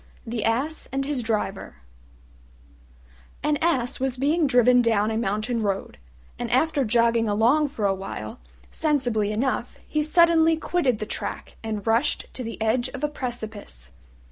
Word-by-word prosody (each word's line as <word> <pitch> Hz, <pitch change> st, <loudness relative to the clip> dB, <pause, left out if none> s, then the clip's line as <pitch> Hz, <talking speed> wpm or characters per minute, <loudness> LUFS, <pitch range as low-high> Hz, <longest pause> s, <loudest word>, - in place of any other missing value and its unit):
THE 230 Hz, -2 st, -3 dB
ASS 265 Hz, +8 st, 0 dB
AND 270 Hz, +1 st, -1 dB
HIS 280 Hz, -3 st, -1 dB
DRIVER 210 Hz, -4 st, -3 dB, 1.7 s
An 300 Hz, 0 st, +2 dB
Ass 275 Hz, -7 st, 0 dB
was 260 Hz, -1 st, -1 dB
being 300 Hz, +4 st, +2 dB
driven 250 Hz, -1 st, +5 dB
down 220 Hz, -2 st, +2 dB
a -, -, -2 dB
mountain 220 Hz, +2 st, -1 dB
road, 195 Hz, -, -3 dB, 0.4 s
and 240 Hz, -, -3 dB
after 285 Hz, +3 st, +2 dB
jogging 230 Hz, -1 st, +2 dB
along 240 Hz, +9 st, +3 dB
for 235 Hz, -7 st, -3 dB
a 195 Hz, -, +3 dB
while 150 Hz, -, -6 dB, 0.3 s
sensibly 245 Hz, -9 st, 0 dB
enough 245 Hz, +2 st, -1 dB
he 305 Hz, -, 0 dB
suddenly 325 Hz, 0 st, +4 dB
quitted 310 Hz, -7 st, 0 dB
the 215 Hz, -, -4 dB
track -, -, -5 dB
and 215 Hz, -2 st, -4 dB
rushed 230 Hz, +6 st, +1 dB
to 255 Hz, -, -5 dB
the 230 Hz, 0 st, -6 dB
edge 235 Hz, +3 st, +1 dB
of 270 Hz, -, -7 dB
a 300 Hz, -, +1 dB
precipice. 220 Hz, -, -6 dB
240 Hz, 150 wpm, -24 LUFS, 220-285 Hz, 1.7 s, driven